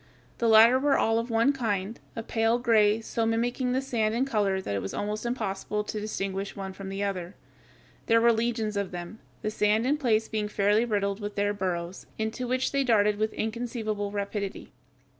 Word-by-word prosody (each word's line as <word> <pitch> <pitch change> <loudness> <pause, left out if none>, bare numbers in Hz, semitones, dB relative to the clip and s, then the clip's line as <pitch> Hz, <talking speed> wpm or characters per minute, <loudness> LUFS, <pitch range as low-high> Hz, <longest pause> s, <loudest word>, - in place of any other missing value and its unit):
The 235 - +2
latter 225 +3 +7
were 280 0 +3
all 225 0 +2
of 230 +2 -4
one 230 +5 +3
kind, 220 -4 -2 0.2
a 225 - -4
pale 225 0 +1
gray, 220 -3 +3
so 225 +1 -2
mimicking 240 +3 0
the 260 +1 0
sand 225 -4 0
in 255 +3 +1
color 205 -7 +1
that 185 - -4
it 100 - -1
was 95 - -5
almost 210 +3 -3
impossible 210 -3 -2
to 210 +1 -4
distinguish 195 -2 -3
one 195 -1 -6
from 195 0 -8
the 195 +1 -3
other. 185 -2 -3 0.7
There 230 0 +5
were 235 0 +5
legions 225 -2 -1
of 200 -2 -1
them, 175 +4 -7 0.2
the 215 - -1
sand 215 +2 +2
in 290 +3 +2
places 225 -6 +1
being 215 -1 -2
fairly 210 +2 +2
riddled 200 -3 -1
with 205 -1 -5
their 205 0 +1
burrows, 180 -2 -4
into 220 +3 -3
which 255 +1 0
they 275 0 +1
darted 210 -4 +3
with 215 0 +1
inconceivable 220 -2 -3
rapidity. 200 -1 -4
215 Hz, 195 wpm, -27 LUFS, 200-235 Hz, 0.7 s, latter